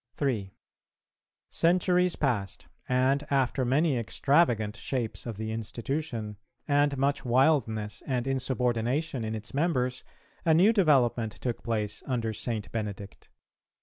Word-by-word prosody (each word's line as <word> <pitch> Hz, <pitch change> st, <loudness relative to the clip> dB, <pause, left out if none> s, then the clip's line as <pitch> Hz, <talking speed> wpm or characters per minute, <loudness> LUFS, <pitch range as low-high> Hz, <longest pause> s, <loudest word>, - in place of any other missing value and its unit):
[396:2] -, -, -36 dB
3. 115 Hz, -9 st, -1 dB, 1.0 s
Centuries 180 Hz, +1 st, +2 dB
passed, 110 Hz, -9 st, -2 dB, 0.2 s
and 130 Hz, +3 st, +2 dB
after 135 Hz, -1 st, +1 dB
many 135 Hz, +2 st, +2 dB
extravagant 115 Hz, -3 st, +2 dB
shapes 120 Hz, -3 st, -4 dB
of 115 Hz, -4 st, -5 dB
the 110 Hz, 0 st, -4 dB
institution, 115 Hz, 0 st, -4 dB, 0.3 s
and 145 Hz, -1 st, +2 dB
much 140 Hz, +2 st, 0 dB
wildness 120 Hz, -5 st, +1 dB
and 125 Hz, -2 st, -1 dB
insubordination 130 Hz, +1 st, -1 dB
in 110 Hz, 0 st, -3 dB
its 110 Hz, 0 st, -7 dB
members, 130 Hz, -5 st, 0 dB, 0.4 s
a 160 Hz, -2 st, +4 dB
new 195 Hz, +7 st, +5 dB
development 125 Hz, -, +3 dB
took 120 Hz, -2 st, -4 dB
place 110 Hz, -2 st, -2 dB
under 115 Hz, -4 st, -1 dB
St. 110 Hz, -1 st, -4 dB
Benedict. 105 Hz, -3 st, -6 dB
125 Hz, 120 wpm, -28 LUFS, 110-145 Hz, 1.0 s, new